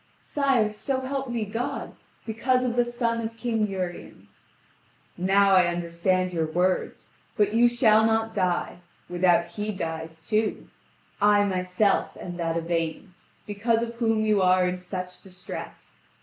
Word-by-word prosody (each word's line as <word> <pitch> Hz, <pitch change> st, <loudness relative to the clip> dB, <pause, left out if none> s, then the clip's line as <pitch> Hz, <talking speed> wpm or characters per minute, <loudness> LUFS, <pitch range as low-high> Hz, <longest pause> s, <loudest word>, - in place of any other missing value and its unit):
"Sire, 260 Hz, -7 st, +1 dB
so 260 Hz, +5 st, -2 dB
help 270 Hz, 0 st, -3 dB
me 235 Hz, -3 st, -2 dB
God, 225 Hz, +4 st, -4 dB, 0.3 s
because 255 Hz, +3 st, +1 dB
of 240 Hz, -1 st, -1 dB
the 245 Hz, -, +4 dB
son 235 Hz, -1 st, -1 dB
of 225 Hz, 0 st, -5 dB
King 225 Hz, -2 st, 0 dB
Urien." 185 Hz, -3 st, -6 dB, 0.9 s
"Now 195 Hz, +2 st, +3 dB
I 185 Hz, -2 st, +6 dB
understand 175 Hz, +2 st, 0 dB
your 165 Hz, -2 st, 0 dB
words, 180 Hz, +3 st, -1 dB, 0.3 s
but 210 Hz, -1 st, +2 dB
you 235 Hz, +2 st, +5 dB
shall 225 Hz, -3 st, +4 dB
not 225 Hz, 0 st, +1 dB
die, 180 Hz, -2 st, -1 dB, 0.3 s
without 175 Hz, -1 st, +3 dB
he 205 Hz, +5 st, -4 dB
dies 160 Hz, -3 st, -5 dB
too. 215 Hz, 0 st, 0 dB, 0.5 s
I 205 Hz, 0 st, +5 dB
myself 185 Hz, +1 st, 0 dB
am 175 Hz, -1 st, -7 dB
that 165 Hz, -1 st, -1 dB
Yvain, 165 Hz, +2 st, -3 dB, 0.3 s
because 225 Hz, +3 st, 0 dB
of 235 Hz, 0 st, -5 dB
whom 225 Hz, -2 st, +1 dB
you 210 Hz, -2 st, +3 dB
are 185 Hz, 0 st, +4 dB
in 180 Hz, 0 st, -3 dB
such 180 Hz, 0 st, -6 dB
distress. 185 Hz, -1 st, -9 dB
200 Hz, 145 wpm, -26 LUFS, 180-225 Hz, 0.9 s, I